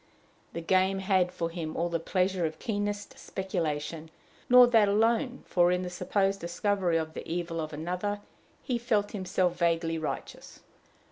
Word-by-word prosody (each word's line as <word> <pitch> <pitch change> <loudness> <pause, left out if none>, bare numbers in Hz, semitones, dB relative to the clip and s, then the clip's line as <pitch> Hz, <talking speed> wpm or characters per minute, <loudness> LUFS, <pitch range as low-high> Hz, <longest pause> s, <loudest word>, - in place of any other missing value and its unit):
The 170 - -4
game 190 +3 +2
had 190 -2 +2
for 165 -2 -3
him 165 -2 -5
all 170 - +1
the 170 -1 -1
pleasure 185 +2 0
of 160 -1 -2
keenest 205 -2 -3
speculation; 165 -4 -3 0.4
nor 250 0 +9
that 225 -4 +4
alone, 230 +5 +1
for, 175 -1 +3
in 180 0 0
the 180 - -5
supposed 195 +2 0
discovery 175 0 0
of 160 -1 -3
the - - -7
evil 170 -1 -2
of 155 - -5
another, 180 +7 -3 0.4
he 245 -3 -1
felt 215 -4 0
himself 185 -2 0
vaguely 165 -1 +1
righteous. 155 - -6
180 Hz, 155 wpm, -29 LUFS, 165-205 Hz, 0.4 s, nor